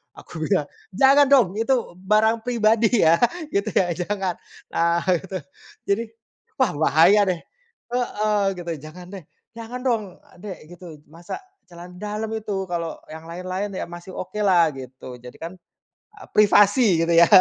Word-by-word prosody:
aku 160 Hz, -, -8 dB
bilang, 170 Hz, -8 st, +1 dB, 0.3 s
"Jangan 275 Hz, +6 st, +6 dB
dong, 255 Hz, -7 st, +6 dB
itu 265 Hz, +4 st, +2 dB, 0.2 s
b 185 Hz, -, -18 dB
barang 220 Hz, +2 st, +3 dB
pribadi, 225 Hz, -2 st, +2 dB, 0.2 s
ya", 160 Hz, +1 st, +6 dB, 0.4 s
gitu 200 Hz, +2 st, 0 dB
ya, 180 Hz, -2 st, +2 dB
"Jangan", 190 Hz, 0 st, -2 dB, 0.4 s
nah, 170 Hz, 0 st, +1 dB, 0.2 s
gitu. 190 Hz, +1 st, -6 dB, 0.5 s
Jadi, 210 Hz, +4 st, +2 dB, 0.6 s
wah, 260 Hz, -, +3 dB
bahaya 165 Hz, +7 st, +5 dB
deh 175 Hz, -, -1 dB, 0.6 s
heeh, 215 Hz, -4 st, 0 dB, 0.2 s
gitu, 170 Hz, -1 st, -5 dB
"Jangan 175 Hz, +3 st, -11 dB
deh, 190 Hz, -4 st, -8 dB, 0.3 s
jangan 230 Hz, +2 st, -7 dB
dong, 230 Hz, -4 st, +1 dB, 0.4 s
Dek", 190 Hz, -6 st, -9 dB
gitu, 175 Hz, -3 st, -11 dB
masa 170 Hz, +2 st, -8 dB, 0.3 s
celana 175 Hz, +1 st, -12 dB
dalem, 215 Hz, +3 st, -4 dB
itu 195 Hz, -2 st, -3 dB
kalau 170 Hz, -2 st, -4 dB
yang 160 Hz, +1 st, -9 dB
lain-lain 185 Hz, +3 st, -4 dB
ya, -, -, -4 dB
masih 175 Hz, +2 st, -10 dB
okelah 185 Hz, -3 st, +2 dB
gitu, 130 Hz, -1 st, -10 dB
jadikan 160 Hz, +8 st, -9 dB, 0.6 s
e 420 Hz, -, -17 dB
privasi 205 Hz, -2 st, +5 dB
gitu -, -, -1 dB
ya, 170 Hz, 0 st, +7 dB
190 Hz, 145 wpm, -23 LUFS, 170-215 Hz, 0.6 s, ya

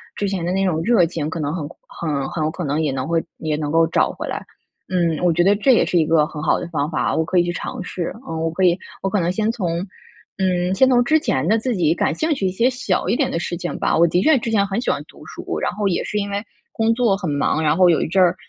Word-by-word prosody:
之 205 Hz, -, -2 dB
前 190 Hz, -3 st, -2 dB
的 175 Hz, -, -1 dB
那 195 Hz, +1 st, +1 dB
种 165 Hz, -4 st, 0 dB
热 220 Hz, -2 st, +4 dB
情 160 Hz, -2 st, -3 dB
可 160 Hz, -, -5 dB
能 150 Hz, +1 st, -2 dB
很 160 Hz, -5 st, -4 dB, 0.2 s
很 145 Hz, -5 st, -3 dB
很 160 Hz, -, -3 dB
有 155 Hz, -, 0 dB
可 175 Hz, +1 st, -5 dB
能 145 Hz, +2 st, 0 dB
也 150 Hz, -3 st, 0 dB
能 130 Hz, 0 st, -3 dB
会 165 Hz, 0 st, 0 dB
也 155 Hz, -1 st, -2 dB
能 150 Hz, -1 st, -3 dB
够 165 Hz, +1 st, +4 dB
找 165 Hz, -, +1 dB
回 -, -, -6 dB
来。 -, -, -5 dB, 0.5 s
嗯， 170 Hz, -4 st, +1 dB
我 175 Hz, -, +4 dB
觉 170 Hz, +2 st, +2 dB
得 200 Hz, +3 st, +4 dB
这 215 Hz, +6 st, +3 dB
也 -, -, +3 dB
是 175 Hz, -, +1 dB
一 -, -, +4 dB
个 155 Hz, -1 st, +3 dB
很 150 Hz, -1 st, -7 dB
好 -, -, +2 dB
的 -, -, -5 dB
方 150 Hz, -3 st, -1 dB
法， 155 Hz, -, -1 dB
我 160 Hz, -, +2 dB
可 180 Hz, +3 st, -1 dB
以 175 Hz, -, +5 dB
去 175 Hz, -, -2 dB
尝 -, -, -5 dB
试。 180 Hz, -1 st, -4 dB, 0.2 s
嗯， 160 Hz, 0 st, -4 dB
我 165 Hz, -, 0 dB
可 165 Hz, +4 st, -2 dB
以 175 Hz, -2 st, +5 dB, 0.3 s
我 -, -, +1 dB
可 205 Hz, -, 0 dB
能 175 Hz, 0 st, 0 dB
先 215 Hz, +3 st, 0 dB
从， 205 Hz, -7 st, -3 dB, 0.7 s
嗯， 180 Hz, -1 st, +1 dB
先 260 Hz, +7 st, +4 dB
从 245 Hz, -2 st, +4 dB
之 310 Hz, +6 st, +3 dB
前 135 Hz, -, -1 dB
的 220 Hz, +4 st, +3 dB
自 245 Hz, +1 st, -1 dB
己 165 Hz, -4 st, +2 dB
感 -, -, 0 dB
兴 315 Hz, 0 st, 0 dB
趣 200 Hz, -9 st, -1 dB
一 -, -, +1 dB
些 230 Hz, +6 st, +2 dB
小 250 Hz, 0 st, -1 dB
一 -, -, +2 dB
点 -, -, +1 dB
的 -, -, -2 dB
事 175 Hz, -, -3 dB
情 175 Hz, 0 st, -4 dB
吧， -, -, +1 dB
我 170 Hz, +1 st, +5 dB
的 175 Hz, +2 st, +1 dB
确 315 Hz, +4 st, +5 dB
之 230 Hz, -, -4 dB
前 205 Hz, -3 st, +2 dB
很 200 Hz, +3 st, -2 dB
喜 -, -, -2 dB
欢 -, -, 0 dB
读 -, -, -16 dB
书， -, -, -5 dB
然 -, -, -1 dB
后 205 Hz, -1 st, -1 dB
也 180 Hz, -, 0 dB
是 210 Hz, -, -3 dB
因 200 Hz, -1 st, -1 dB
为 200 Hz, +1 st, -2 dB, 0.3 s
工 225 Hz, 0 st, +1 dB
作 230 Hz, -4 st, +2 dB
很 190 Hz, -4 st, -4 dB
忙， 145 Hz, +2 st, 0 dB
然 155 Hz, 0 st, +2 dB
后 185 Hz, -1 st, +6 dB
有 165 Hz, -, +3 dB
一 -, -, -1 dB
阵 190 Hz, +5 st, +1 dB
儿 175 Hz, -, +3 dB
175 Hz, 320 characters per minute, -20 LUFS, 160-200 Hz, 0.7 s, 后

